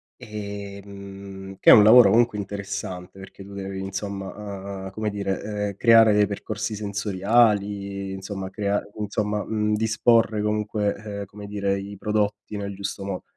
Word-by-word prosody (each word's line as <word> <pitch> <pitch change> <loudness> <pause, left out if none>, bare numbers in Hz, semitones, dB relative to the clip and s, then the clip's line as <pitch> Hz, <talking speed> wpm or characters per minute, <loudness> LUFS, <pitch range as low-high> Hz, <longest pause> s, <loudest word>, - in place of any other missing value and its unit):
ehm, 100 -3 -8
che - - +5
è - - +12
un 105 - +9
lavoro 110 0 +8
comunque 115 -1 +3
interessante 95 -2 -5
perché 95 0 -11
tu 100 +1 -12
devi 95 -1 -5
insomma, 100 0 -6
uhm, 95 - -5
come 110 +1 -2
dire, 100 -2 -2 0.3
ehm, 100 - -8
creare 115 0 +6
dei 105 0 +4
percorsi 105 +2 -4
sensoriali, 100 -1 +1
insomma 95 0 -5
crea 100 +1 -1 0.2
insomma, 105 0 -1
mhmm, 105 -1 0
disporre 110 0 +2
comunque, 105 -1 0
ehm, 100 -1 -6
come 100 +1 -11
dire, 100 -1 -1
i 100 +1 -8
prodotti 105 0 -1
nel 100 -1 -4
giusto 100 0 -5
mo 95 -2 -4
100 Hz, 150 wpm, -24 LUFS, 100-105 Hz, 0.3 s, è